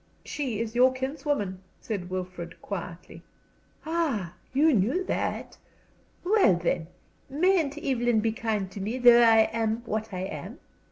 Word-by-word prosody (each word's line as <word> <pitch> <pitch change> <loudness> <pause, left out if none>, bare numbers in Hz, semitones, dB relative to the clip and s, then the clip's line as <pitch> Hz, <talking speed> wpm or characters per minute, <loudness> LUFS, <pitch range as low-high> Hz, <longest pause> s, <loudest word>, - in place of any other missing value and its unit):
"She 255 -8 -3
is 225 -1 -3
your 250 +2 +5
kinswoman," 260 - -2 0.2
said 195 -5 -5
Wilfrid, 185 -2 -6
quietly. 180 -3 -7 0.6
"Ah, 300 - -1 0.2
you 300 +4 +4
knew 245 - +1
that! - - -3 0.6
Well, 380 - +4
then, 170 -1 -1 0.4
mayn't 315 -1 +2
Evelyn 240 -5 +1
be 220 +1 +1
kind 215 -4 -2
to 200 - -7
me, 220 +6 -2
though 240 -1 +7
I 225 -1 +7
am 225 0 -1
what 220 0 -3
I 185 -1 -4
am? 190 - -6
230 Hz, 135 wpm, -27 LUFS, 195-270 Hz, 0.6 s, though